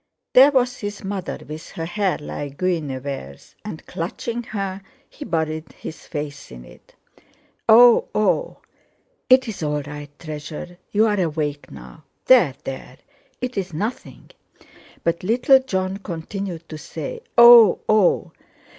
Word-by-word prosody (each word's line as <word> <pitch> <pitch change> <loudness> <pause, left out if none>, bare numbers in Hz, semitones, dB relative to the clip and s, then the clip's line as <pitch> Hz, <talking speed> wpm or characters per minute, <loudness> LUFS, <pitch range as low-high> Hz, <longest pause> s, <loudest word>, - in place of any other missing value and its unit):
There 265 +3 +8
was 255 -3 +1
his 205 -1 -6
mother, 195 -2 -4
with 155 +1 -8
her 165 - -4
hair 195 +2 -1
like 145 -1 -7
Guinevere's, 140 - -4
and, 210 -7 -8
clutching 230 +8 -4
her, 195 -3 -4 0.3
he 295 - -10
buried 160 - -3
his 160 - -10
face 145 -2 -6
in - - -11
it. - - -19 0.7
"Oh! 235 +2 +7
oh!" 355 - 0 0.7
"It's 255 -6 +3
all 150 -1 -1
right, 145 0 -8
treasure. 155 +3 -8
You're 210 -1 +2
awake 150 -3 -3
now. 155 - -13 0.2
There! 185 - +5
There! 130 -1 -7 0.4
It's 200 -8 -3
nothing!" 215 +10 -5 0.7
But 170 0 0
little 245 +6 +4
Jon 190 -7 -2
continued 175 -1 -6
to 155 - -7
say: 470 - -7 0.2
"Oh! 235 -4 +9
oh!" 195 -4 +3
180 Hz, 125 wpm, -22 LUFS, 155-220 Hz, 0.7 s, Oh